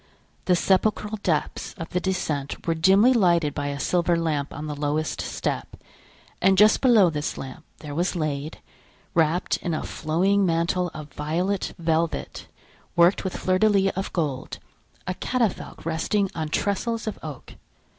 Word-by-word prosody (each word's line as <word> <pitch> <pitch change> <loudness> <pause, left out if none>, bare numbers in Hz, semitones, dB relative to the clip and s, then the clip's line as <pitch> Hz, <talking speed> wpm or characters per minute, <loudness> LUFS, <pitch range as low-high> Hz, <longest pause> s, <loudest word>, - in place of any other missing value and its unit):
The 180 - +4
sepulchral 210 +4 +1
depths 160 -7 -1
of 165 -3 -6
the 180 - 0
descent 155 -7 -3
were 165 - +2
dimly 195 +9 +5
lighted 170 - +3
by 145 -1 -3
a 140 0 -3
silver 175 +1 +1
lamp 155 -4 -1
on 150 - -6
the 150 -1 -4
lowest 150 +2 -1
step; - - -3 0.7
and 190 +1 +4
just 210 +2 +6
below 220 -9 +5
this 150 -1 -3
lamp 135 +4 -8 0.2
there 150 -2 -7
was 175 +5 0
laid, 155 -2 -3 0.6
wrapped 165 +2 +2
in 170 -2 -3
a - - -3
flowing 185 +6 +1
mantle 175 +1 +1
of 155 -1 -9
violet 175 +6 -2
velvet, 165 0 -1 0.5
worked 175 +2 +4
with 190 - -3
fleurs 185 0 +1
de 215 - +5
lis 195 -2 +3
of 190 +1 -3
gold, 145 -7 -2 0.5
a 185 - -2
catafalque 230 -3 -2
resting 185 +5 0
on 155 -2 -3
trestles 225 +7 -1
of 215 - -4
oak. 150 -5 -8
170 Hz, 155 wpm, -24 LUFS, 155-195 Hz, 0.7 s, just